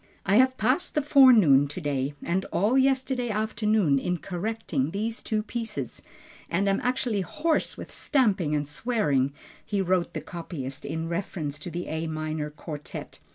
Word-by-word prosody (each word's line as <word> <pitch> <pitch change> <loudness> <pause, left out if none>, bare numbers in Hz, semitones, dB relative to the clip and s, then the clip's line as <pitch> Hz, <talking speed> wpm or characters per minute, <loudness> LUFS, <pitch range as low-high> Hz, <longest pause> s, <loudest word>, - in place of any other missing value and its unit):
"I 195 +2 +4
have 260 +1 +4
passed 255 +10 +1
the 300 - +2
forenoon 225 - +7
to 145 - -6
day, 145 -3 -2
and 185 +2 0
all 210 +7 +1
yesterday 265 -2 +2
afternoon 210 -7 +1
in 180 +5 -1
correcting 175 -6 -2
these 220 +6 -3
two 215 -1 -1
pieces 225 - -5 0.5
and 190 +4 +1
am 195 0 +2
actually 250 -4 0
hoarse 305 - -1
with - - -8
stamping 195 - +1
and 145 -1 -1
swearing," 145 - 0 0.3
he 205 - -2
wrote 185 -2 0
the - - -2
copyist 160 -6 -7
in 160 +2 -3
reference 165 -4 -3
to 165 - -7
the 175 +1 -5
A 160 +1 -3
minor 155 -1 -3
Quartet. 150 0 -8
185 Hz, 155 wpm, -27 LUFS, 155-225 Hz, 0.5 s, forenoon